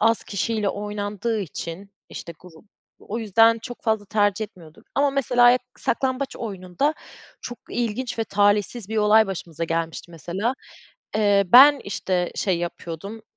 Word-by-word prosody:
az 225 Hz, +1 st, +4 dB
kişiyle 210 Hz, 0 st, -1 dB
oynandığı 205 Hz, +2 st, -3 dB
için, 180 Hz, +1 st, -7 dB, 0.2 s
işte 170 Hz, -, -8 dB
grup, 175 Hz, 0 st, -16 dB, 0.3 s
o 220 Hz, -, -6 dB
yüzden 225 Hz, +1 st, +4 dB
çok 245 Hz, +2 st, -9 dB
fazla 220 Hz, -2 st, 0 dB
tercih 205 Hz, +1 st, +1 dB
etmiyorduk 170 Hz, -6 st, -16 dB
ama 280 Hz, 0 st, +3 dB
mesela 245 Hz, -2 st, +4 dB, 0.2 s
saklambaç 265 Hz, +2 st, -1 dB
oyununda 200 Hz, -, -2 dB, 0.5 s
çok 245 Hz, -2 st, -7 dB
ilginç 240 Hz, +1 st, -3 dB
ve 225 Hz, -, 0 dB
talihsiz 205 Hz, +1 st, +1 dB
bir 220 Hz, -, -3 dB
olay 215 Hz, +1 st, +5 dB
başımıza 170 Hz, -4 st, -5 dB
gelmişti 165 Hz, +1 st, -3 dB
mesela. 185 Hz, -, -3 dB, 0.6 s
Eee, 205 Hz, -2 st, +4 dB
ben 270 Hz, +8 st, +8 dB
işte 185 Hz, -3 st, -2 dB
şey 185 Hz, -4 st, 0 dB
yapıyordum, 175 Hz, +5 st, -6 dB
210 Hz, 135 wpm, -23 LUFS, 185-230 Hz, 0.6 s, ben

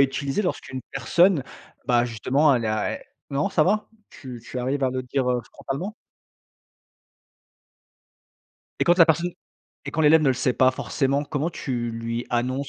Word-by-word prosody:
utiliser 140 Hz, +6 st, +1 dB
lorsqu'une 130 Hz, -7 st, -3 dB
personne, 160 Hz, -, +3 dB, 0.4 s
bah, 120 Hz, -1 st, +3 dB
justement, 130 Hz, +5 st, +2 dB
elle 120 Hz, -2 st, -1 dB
est -, -, 0 dB
à 110 Hz, -1 st, -1 dB
et -, -, -17 dB, 0.3 s
Non, 140 Hz, +7 st, 0 dB
ça 165 Hz, -5 st, +3 dB
va? 210 Hz, +3 st, +1 dB, 0.2 s
Tu 125 Hz, -4 st, -9 dB
tu 125 Hz, -, -6 dB
arrives 135 Hz, +3 st, -1 dB
à 130 Hz, -, +1 dB
le 130 Hz, 0 st, -3 dB
dire 130 Hz, +1 st, -1 dB, 0.3 s
frontalement? 175 Hz, +11 st, -5 dB, 2.9 s
Et -, -, +3 dB
quand 175 Hz, +1 st, +4 dB
la 165 Hz, -, +8 dB
personne 170 Hz, +2 st, +1 dB, 0.5 s
et 145 Hz, -, -5 dB
quand 160 Hz, -, -1 dB
l'élève 155 Hz, +1 st, +6 dB
ne 145 Hz, -, +3 dB
le 130 Hz, -, +3 dB
sait 130 Hz, 0 st, +1 dB
pas 130 Hz, +1 st, +4 dB
forcément, 135 Hz, +1 st, -1 dB
comment 150 Hz, +3 st, -2 dB
tu 120 Hz, -7 st, -3 dB
lui 115 Hz, +1 st, -4 dB
annonces? 130 Hz, +3 st, -1 dB
135 Hz, 165 wpm, -24 LUFS, 125-155 Hz, 2.9 s, la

